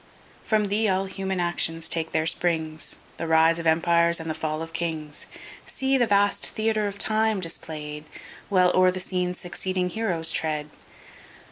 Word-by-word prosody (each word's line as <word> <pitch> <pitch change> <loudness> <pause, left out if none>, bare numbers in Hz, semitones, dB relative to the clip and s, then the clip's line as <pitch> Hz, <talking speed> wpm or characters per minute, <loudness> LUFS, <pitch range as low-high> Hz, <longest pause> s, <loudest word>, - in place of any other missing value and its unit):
From 215 -2 +2
Thee[*] 210 +1 +2
all 190 0 +1
human 190 -1 -3
actions 165 -2 0
take 165 -1 -1
their 155 - +1
springs, 160 -2 -1 0.2
The 165 - -3
rise 160 +1 +4
of 165 - -2
empires 170 +1 +3
and 165 - -6
the 160 - -1
fall 155 0 -3
of 165 0 -9
kings! 155 -3 -3 0.4
See 270 0 0
the 245 -3 +3
vast 205 0 +3
Theatre 215 -1 +1
of 200 0 -6
Time 220 0 +1
display'd, 155 -3 -5 0.4
While 180 -3 +4
o'er 185 0 +5
the 185 0 -2
scene 180 -1 -1
succeeding 180 +1 -2
heroes 175 -8 0
tread! 150 -1 -1
175 Hz, 160 wpm, -25 LUFS, 160-195 Hz, 0.4 s, o'er